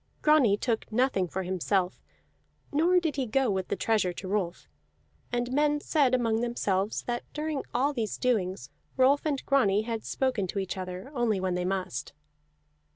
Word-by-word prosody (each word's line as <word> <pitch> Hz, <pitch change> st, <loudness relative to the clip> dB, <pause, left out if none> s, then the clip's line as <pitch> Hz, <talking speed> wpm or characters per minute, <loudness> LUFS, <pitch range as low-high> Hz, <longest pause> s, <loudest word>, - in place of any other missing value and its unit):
Grani 280 Hz, -10 st, +5 dB
took 225 Hz, -1 st, -2 dB
nothing 220 Hz, -5 st, +2 dB
for 190 Hz, +2 st, -3 dB
himself, 185 Hz, 0 st, -1 dB, 0.7 s
nor 340 Hz, +5 st, +4 dB
did 320 Hz, -5 st, -2 dB
he 260 Hz, -2 st, 0 dB
go 255 Hz, +1 st, +2 dB
with 190 Hz, -1 st, -1 dB
the -, -, -1 dB
treasure 215 Hz, -5 st, +1 dB
to 185 Hz, +2 st, -7 dB
Rolf; 185 Hz, -3 st, -2 dB, 0.6 s
and 245 Hz, 0 st, -1 dB
men 295 Hz, +2 st, +2 dB
said 285 Hz, -4 st, +2 dB
among 230 Hz, -2 st, +1 dB
themselves 210 Hz, -4 st, -1 dB
that, 240 Hz, 0 st, -2 dB
during 300 Hz, -2 st, -2 dB
all 275 Hz, +5 st, +1 dB
these 225 Hz, -5 st, -2 dB
doings, 185 Hz, -, -1 dB, 0.3 s
Rolf 275 Hz, +4 st, +4 dB
and 280 Hz, -3 st, -2 dB
Grani 215 Hz, -7 st, +3 dB
had 225 Hz, -1 st, -4 dB
spoken 250 Hz, -8 st, -1 dB
to 190 Hz, -, -5 dB
each 190 Hz, -2 st, -2 dB
other 185 Hz, +6 st, -6 dB
only 235 Hz, -6 st, +1 dB
when 185 Hz, -1 st, -1 dB
they 180 Hz, 0 st, -1 dB
must. 185 Hz, -9 st, -3 dB
225 Hz, 165 wpm, -28 LUFS, 190-270 Hz, 0.7 s, Grani